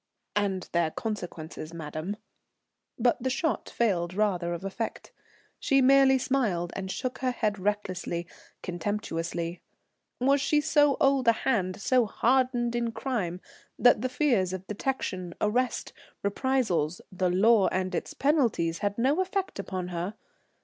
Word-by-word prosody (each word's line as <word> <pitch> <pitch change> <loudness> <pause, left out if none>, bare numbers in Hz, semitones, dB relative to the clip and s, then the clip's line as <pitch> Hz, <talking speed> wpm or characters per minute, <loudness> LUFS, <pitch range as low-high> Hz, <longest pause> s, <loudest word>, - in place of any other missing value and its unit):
"And 200 -3 0
their 170 -2 +2
consequences, 170 -5 -6
madam," 160 +5 -5 0.8
but - - +2
the 260 - 0
shot 270 0 -1
failed 180 -6 0
rather 185 -5 +1
of 170 +1 -4
effect. 220 +4 -4 0.5
She 275 - +3
merely 270 0 +6
smiled 225 -11 0
and 190 -1 -4
shook 255 +6 -3
her 260 - +1
head 215 -5 -1
recklessly, 185 -3 -2 0.4
contemptuously. 175 -2 -3 0.6
Was 275 +2 +3
she 295 +2 +3
so 295 -2 +3
old 270 -2 +3
a 230 - +7
hand, 185 -7 0
so 250 +1 +3
hardened 245 +1 +1
in 235 -1 0
crime, 190 -11 -2 0.4
that 245 -3 +5
the 255 - -1
fears 240 - +1
of 185 0 -5
detection, 190 -5 -3
arrest, 245 +4 0 0.3
reprisals, 200 - 0
the 185 -1 0
law 200 +3 +5
and 185 0 -1
its - - -3
penalties 240 - +1
had 205 0 -1
no 275 +9 +2
effect 375 - -2
upon 185 -2 -4
her? 180 +4 -3
210 Hz, 135 wpm, -28 LUFS, 180-255 Hz, 0.8 s, a